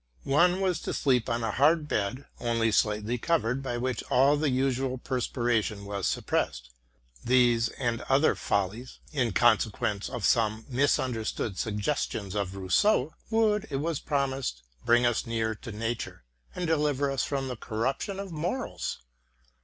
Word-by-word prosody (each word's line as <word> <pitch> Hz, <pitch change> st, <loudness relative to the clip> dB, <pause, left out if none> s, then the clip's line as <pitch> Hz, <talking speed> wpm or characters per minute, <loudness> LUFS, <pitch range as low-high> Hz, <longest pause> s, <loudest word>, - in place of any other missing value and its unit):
One 175 Hz, +6 st, +3 dB
was 185 Hz, -3 st, +1 dB
to -, -, -3 dB
sleep 125 Hz, -4 st, +2 dB
on 115 Hz, 0 st, -1 dB
a 110 Hz, -, 0 dB
hard 150 Hz, +5 st, +3 dB
bed, 115 Hz, +4 st, -2 dB
only 115 Hz, -1 st, +1 dB
slightly 105 Hz, +3 st, +1 dB
covered, 135 Hz, -4 st, 0 dB
by 125 Hz, -3 st, -3 dB
which 125 Hz, +1 st, -2 dB
all 135 Hz, +3 st, +5 dB
the 150 Hz, 0 st, +1 dB
usual 130 Hz, 0 st, 0 dB
perspiration 120 Hz, -5 st, -1 dB
was 100 Hz, -2 st, -2 dB
suppressed. -, -, -1 dB, 0.5 s
These 120 Hz, -2 st, +4 dB
and 120 Hz, -1 st, -2 dB
other 140 Hz, +4 st, +4 dB
follies, 105 Hz, +6 st, -2 dB
in 130 Hz, -7 st, 0 dB
consequence 105 Hz, -2 st, +2 dB
of 120 Hz, -5 st, -3 dB
some 110 Hz, -2 st, +2 dB
misunderstood 120 Hz, -6 st, 0 dB
suggestions 105 Hz, -2 st, -2 dB
of 100 Hz, -2 st, -2 dB
Rous 95 Hz, -1 st, +2 dB
seau, 205 Hz, -9 st, +2 dB, 0.2 s
would, 220 Hz, -2 st, +2 dB
it 140 Hz, -, -3 dB
was 155 Hz, +1 st, -1 dB
promised, 135 Hz, -, -2 dB, 0.2 s
bring 120 Hz, +1 st, +4 dB
us 120 Hz, 0 st, +1 dB
nearer 110 Hz, -1 st, 0 dB
to 115 Hz, +2 st, -9 dB
nature, 115 Hz, -, -4 dB, 0.3 s
and 180 Hz, -, -2 dB
deliver 145 Hz, -3 st, +1 dB
us 135 Hz, -5 st, 0 dB
from 135 Hz, +2 st, -2 dB
the 125 Hz, -, -4 dB
corruption 130 Hz, -, -2 dB
of 195 Hz, -2 st, -6 dB
morals. 175 Hz, -, -3 dB
125 Hz, 150 wpm, -28 LUFS, 110-140 Hz, 0.5 s, all